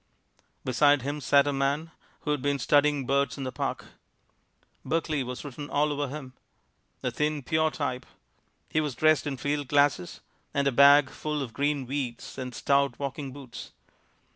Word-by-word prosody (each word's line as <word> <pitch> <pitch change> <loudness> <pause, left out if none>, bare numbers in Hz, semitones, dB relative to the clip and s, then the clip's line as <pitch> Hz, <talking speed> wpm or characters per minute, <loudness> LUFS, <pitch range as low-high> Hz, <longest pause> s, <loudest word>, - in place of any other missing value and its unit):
Beside 145 +1 +4
him 145 +2 -3
sat 140 +2 +4
a 145 - 0
man 140 +4 -1 0.3
who 150 - -2
had 145 -3 0
been 140 +1 +1
studying 145 0 +3
birds 140 +2 +1
in 135 - -4
the 130 - -3
Park. - - -3 1.0
Berkeley 155 -3 -1
was 125 +3 -6
written 145 +1 -7
all 150 +1 +1
over 145 0 -2
him. 135 -2 -8 0.7
A 125 - 0
thin, 150 +3 -1
pure 155 +4 +2
type. 130 -5 -4 0.6
He 155 - +1
was 150 -5 -3
dressed 155 -2 +3
in 135 -2 -3
field 145 +2 -2
glasses 145 -10 +1 0.3
and 140 - +2
a - - +3
bag 140 +1 +6
full 150 -2 -3
of 120 -4 -8
green 145 -1 0
weeds 130 -1 -4
and 125 -1 -5
stout 140 0 +2
walking 140 0 -4
boots. 130 -3 -10
140 Hz, 165 wpm, -27 LUFS, 130-150 Hz, 1.0 s, bag